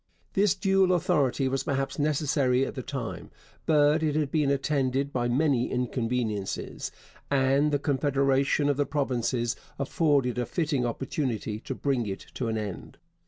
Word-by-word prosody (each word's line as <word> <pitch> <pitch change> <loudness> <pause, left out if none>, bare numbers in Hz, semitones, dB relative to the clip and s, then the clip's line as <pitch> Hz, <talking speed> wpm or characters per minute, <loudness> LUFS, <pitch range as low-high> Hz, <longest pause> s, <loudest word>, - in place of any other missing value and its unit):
This 200 -1 +3
dual 195 -1 +3
authority 145 -6 +1
was 135 +1 0
perhaps 135 -1 -2
necessary 140 -3 +2
at - - -5
the 130 - -5
time, 125 -2 -5 0.4
but 150 0 +4
it 155 -2 0
had 150 -3 0
been 150 -3 +2
attended 140 -1 0
by 120 -1 0
many 130 -1 +2
inconveniences, 115 -4 -2 0.4
and 140 +2 +3
the 145 - +3
confederation 140 0 +1
of 145 -2 +1
the 145 - +1
provinces 125 -4 -1 0.2
afforded 140 -3 +1
a 120 - -1
fitting 145 -7 0
opportunity 120 -4 -3
to - - -5
bring 130 -5 0
it 95 -1 -5
to 125 - -3
an 110 -1 -1
end. 105 -4 -6
135 Hz, 150 wpm, -27 LUFS, 125-150 Hz, 0.4 s, but